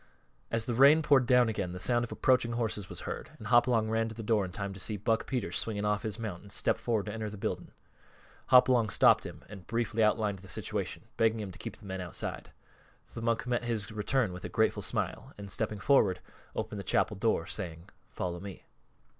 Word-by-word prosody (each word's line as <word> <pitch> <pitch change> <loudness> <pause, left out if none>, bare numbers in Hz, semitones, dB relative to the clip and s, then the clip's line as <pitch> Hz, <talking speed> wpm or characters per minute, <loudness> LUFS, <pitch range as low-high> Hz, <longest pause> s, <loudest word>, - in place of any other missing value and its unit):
As 115 -1 -1
the 120 - -1
rain 140 +6 +6
poured 135 -4 +4
down 125 -1 +5
again 100 -5 -2
the 90 - -6
sound 120 +5 +2
of 120 - -5
approaching 125 -2 +2
horses 110 -4 -2
was - - -5
heard, - - -5
and 105 - -8
Hopalong 120 -2 +4
ran 115 0 0
to 110 - -9
the 115 - -6
door 105 -1 +2
in 90 - -7
time 100 +1 -4
to 95 - -10
see 105 +3 -3
Buck 110 +3 0
Peters 120 -9 -1
swing 105 -2 -2
off 105 -1 +1
his 110 -2 -4
mount 105 -7 -5
and 100 - -13
step - - 0
forward 110 -4 0
to 105 - -5
enter 110 -1 -3
the 105 - -8
building. - - -3 0.8
Hopalong 125 -3 +6
stopped - - +4
him - - -11
and 100 -4 -11
briefly 115 -1 -1
outlined 105 -2 +1
the 95 - -13
situation, - - -3
begging 115 0 +3
him 100 -3 -5
to - - -13
keep - - -6
the 105 - -16
men 95 -1 -4
outside. 90 -2 -5 0.6
The 115 - -6
monk 115 0 0
met 120 -1 -1
his 110 -4 -1
return 110 0 0
with 90 - -8
a - - -4
grateful - - +1
smile - - -3
and, 100 -1 -6
stepping 105 - -1
forward, 100 -8 +3 0.4
opened - - -3
the - - -5
chapel - - +1
door, - - +1
saying, 85 +2 -6 0.2
"Follow 90 -1 -4
me." 100 +1 -9
110 Hz, 220 wpm, -30 LUFS, 100-120 Hz, 0.8 s, rain